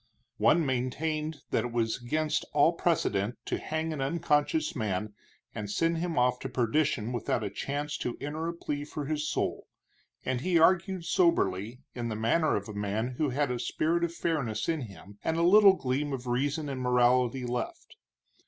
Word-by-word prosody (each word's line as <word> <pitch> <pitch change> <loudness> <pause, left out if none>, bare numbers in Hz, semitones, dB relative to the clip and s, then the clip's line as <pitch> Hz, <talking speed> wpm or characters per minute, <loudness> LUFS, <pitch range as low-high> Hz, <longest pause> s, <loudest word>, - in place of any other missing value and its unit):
One 165 0 +4
maintained 150 +4 -2
that 115 - +1
it 120 - -4
was 115 0 -1
against 155 +5 0
all 150 +3 +5
precedent 120 - 0
to - - -2
hang 160 +1 -2
an 145 - -4
unconscious 165 - +1
man 105 -3 -2 0.4
and 105 -1 -5
send 165 +9 +1
him 170 -1 -2
off 125 0 +3
to 135 - -5
perdition 125 -1 0
without 120 - -1
a - - -3
chance 145 +1 -3
to 120 - -3
enter 155 +3 -3
a 170 - -2
plea 145 -3 -3
for 150 0 -5
his 150 +1 -1
soul, - - -2 0.6
and 130 -2 -1
he 180 +2 +2
argued 185 +1 +3
soberly, 125 - +1
in 120 -1 -3
the 110 - -3
manner 120 +9 +2
of 100 -1 -3
a 110 - -7
man 105 +3 -1
who 150 -2 +2
had 140 +1 0
a 125 - -2
spirit 170 +6 0
of 170 - 0
fairness 145 -11 -2
in 160 -3 0
him, 100 -2 -11
and 160 - 0
a 170 - +2
little 200 +2 +8
gleam 140 -2 -2
of 130 -1 -4
reason 140 +5 -1
and 135 -2 -4
morality 125 0 +3
left. 120 0 -4
140 Hz, 180 wpm, -29 LUFS, 120-160 Hz, 0.6 s, little